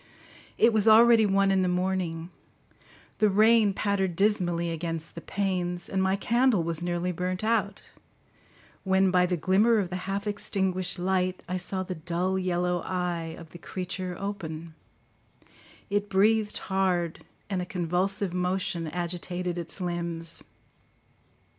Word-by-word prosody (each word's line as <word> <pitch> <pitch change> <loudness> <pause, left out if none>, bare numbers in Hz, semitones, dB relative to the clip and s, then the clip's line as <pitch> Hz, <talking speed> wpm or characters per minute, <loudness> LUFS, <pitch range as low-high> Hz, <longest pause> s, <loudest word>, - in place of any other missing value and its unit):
It 230 - +5
was 215 0 +2
already 225 0 +7
one 195 0 +3
in 190 -1 +3
the 185 - +1
morning; 180 -2 -1 0.9
the 215 - +4
rain 215 +1 +5
pattered 195 -3 -1
dismally 175 -4 +1
against 165 0 -4
the 170 - -8
panes, 180 -3 -2
and 190 - -1
my 190 0 +2
candle 235 -1 +2
was 165 -1 -2
nearly 175 +1 -1
burnt 180 +2 -3
out, 215 -3 0 1.0
when, 190 -1 +3
by 180 0 +4
the 180 -1 -1
glimmer 200 +7 +3
of 190 -4 -1
the - - -2
half 200 +1 -2
extinguished 190 -3 -1
light, 185 0 0
I 185 - -2
saw 185 +1 -2
the 185 - -5
dull 175 +3 -1
yellow 180 -1 0
eye 175 -3 -3
of 165 -1 -11
the 175 - -12
creature 185 0 -5
open; 170 -5 -5 1.2
it 205 0 0
breathed 210 +2 +2
hard, 185 -4 -1 0.2
and 190 -3 -2
a - - -3
convulsive 180 +2 -1
motion 180 -2 -1
agitated 175 +1 -3
its 170 +3 -6
limbs. 170 -2 -2
185 Hz, 140 wpm, -27 LUFS, 175-195 Hz, 1.2 s, already